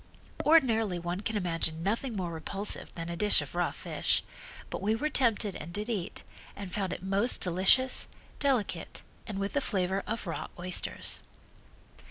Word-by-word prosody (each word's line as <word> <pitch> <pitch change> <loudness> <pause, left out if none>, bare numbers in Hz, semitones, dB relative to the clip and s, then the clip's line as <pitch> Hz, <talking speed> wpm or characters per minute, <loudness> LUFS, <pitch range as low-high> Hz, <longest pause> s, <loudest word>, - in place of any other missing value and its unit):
Ordinarily 225 - +4
one 175 +2 -3
can 220 +1 -1
imagine 165 -3 0
nothing 225 +5 -1
more 180 -3 -2
repulsive 195 +5 0
than 165 -1 -5
a 170 - -4
dish 210 +4 +6
of - - -6
raw - - +1
fish, - - 0 0.5
but - - -4
we 210 +3 +2
were 300 +7 -1
tempted 220 -7 +2
and 155 +3 -7
did 210 +5 -3
eat, 200 -7 -3 0.3
and 195 -3 -7
found 195 -3 -1
it - - -5
most 200 +5 +3
delicious, 190 +9 +3 0.3
delicate, 265 -7 -1 0.2
and 210 -4 -4
with 200 +4 -3
a 285 - +3
flavor 190 -4 0
of 225 0 -3
raw 165 - -4
oysters. 180 +1 0
200 Hz, 165 wpm, -30 LUFS, 180-225 Hz, 0.5 s, dish